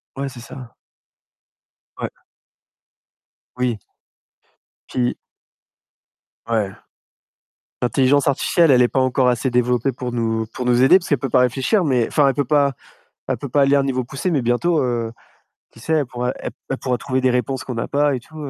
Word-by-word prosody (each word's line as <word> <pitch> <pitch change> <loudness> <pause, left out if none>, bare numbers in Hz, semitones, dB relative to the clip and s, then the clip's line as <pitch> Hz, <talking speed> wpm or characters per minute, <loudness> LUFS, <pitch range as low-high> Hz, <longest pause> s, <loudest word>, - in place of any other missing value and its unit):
Ouais, 135 0 -3
c'est 125 - -11
ça. 125 -1 -11 1.2
Ouais. - - -3 1.5
Oui. 120 -4 -1 1.1
Puis 125 -1 -1 1.3
Ouais. 110 -4 0 1.1
L'intelligence 135 +4 +3
artificielle, 160 +3 +3
elle 125 - +5
est 120 - +5
pas 135 - 0
encore 130 0 +2
assez 125 +2 +1
développée 125 +1 +1
pour 125 0 -5
nous 110 -1 -1
pour 125 - -4
nous 125 0 +3
aider, 160 +8 +7
parce 175 - -9
qu'elle 145 - +2
peut 135 - -3
pas 125 - +3
réfléchir, 135 - +2
mais 125 -5 +2
enfin, 145 -3 +3
elle 135 - +1
peut 145 - 0
pas 140 +1 +2 0.5
elle - - -2
peut 140 - -6
pas 140 +3 +2
aller 140 +1 +4
à 140 - +4
un - - +1
niveau 130 -2 -1
poussé, 135 +8 -3
mais 145 -7 +1
bientôt, 150 +8 +1
heu, 120 -2 -2 0.6
qui 115 - -17
sait, 160 +7 -1
elle 150 -4 +1
pourra 125 +1 -3
elle - - -6 0.3
pourra 125 -2 0
trouver 130 0 -2
des 130 - +2
réponses 125 +1 -1
qu'on 125 -3 -5
a - - -3
pas 145 0 +2
et 125 - -3
tout, 155 - -17
130 Hz, 180 wpm, -20 LUFS, 120-140 Hz, 1.5 s, aider